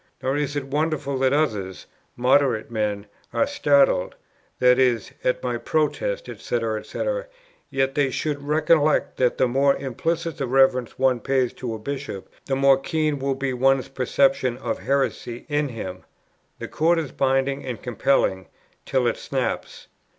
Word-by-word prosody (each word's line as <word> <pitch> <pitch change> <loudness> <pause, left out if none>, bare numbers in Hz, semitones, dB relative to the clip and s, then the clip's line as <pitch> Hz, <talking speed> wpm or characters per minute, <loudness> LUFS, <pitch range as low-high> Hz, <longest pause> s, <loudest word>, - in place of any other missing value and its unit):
Nor 130 +1 0
is 145 -1 -1
it 145 - -1
wonderful 145 -1 -1
that 130 0 +3
others" 105 -11 -1 0.3
[moderate 125 -3 +2
men] 105 -2 -2 0.3
"are - - +2
startled" 285 - +2 0.4
[i.e. 125 -1 +4 0.2
at 125 - 0
my 120 -2 -2
Protest, - - -1
&c. - - -7 0.5
&c.]; - - -5 0.6
"yet 135 0 0
they 140 -1 +2
should 145 +2 -2
recollect 155 +1 +2
that 125 -1 +2
the 130 - +3
more 140 +3 +3
implicit 165 +5 -3
the 135 - -1
reverence 130 -1 +2
one 130 -2 +2
pays 130 -1 0
to 120 -3 -5
a - - -5
Bishop, 135 -4 -6 0.2
the 135 - 0
more 135 0 +4
keen 155 0 -1
will 135 0 -1
be 135 -1 -2
one's 135 +1 +2
perception 130 -1 +1
of - - -3
heresy 130 -3 -2
in 145 -2 0
him. 95 -6 -7 0.5
The - - -6
cord 165 +2 +2
is 155 -5 -2
binding 135 +1 0
and 125 -3 -5
compelling, 120 -6 0 0.4
till 130 -2 +1
it 120 - +1
snaps. - - -3
135 Hz, 150 wpm, -23 LUFS, 125-145 Hz, 0.6 s, i.e